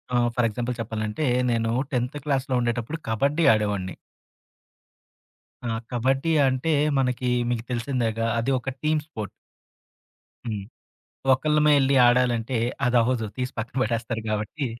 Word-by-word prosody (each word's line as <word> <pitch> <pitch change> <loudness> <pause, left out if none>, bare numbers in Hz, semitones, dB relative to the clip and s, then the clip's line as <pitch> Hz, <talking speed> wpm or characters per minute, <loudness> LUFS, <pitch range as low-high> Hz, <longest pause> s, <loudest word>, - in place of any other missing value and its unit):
ఆ! - - +4 0.2
For 125 -2 +3
example 120 +2 -3
చెప్పాలంటే, 110 +4 -3 0.3
నేను 115 -1 0 0.2
10థ్ 125 +2 -1
క్లాస్‌లో 135 -2 0
ఉండేటప్పుడు 120 +5 -2
కబడ్డీ 140 +9 +1
ఆడేవాడిని. 100 -4 -1 1.7
ఆ! - - -1 0.2
కబడ్డీ 135 +6 +1 0.2
అంటే 130 +5 0 0.3
మనకి 125 -1 0 0.2
మీకు 120 -2 -1
తెలిసిందేగ. 120 -2 -1 0.2
అది 120 +4 0
ఒక 125 - -4
టీమ్ 155 0 +2
స్పోర్ట్. 110 - -6 1.2
హ్మ్. 110 -4 -3 0.7
ఒకళ్ళమే 150 +3 +3
ఎళ్లి 135 +1 +2
ఆడాలంటే 120 0 +2 0.3
అదవ్వదు, 120 -1 +2
తీసి 125 -1 -3
పక్కన 115 +3 -5
బడేస్తారు 115 -1 -2
గాబట్టి 105 +7 -2
120 Hz, 120 wpm, -25 LUFS, 115-135 Hz, 1.7 s, ఆ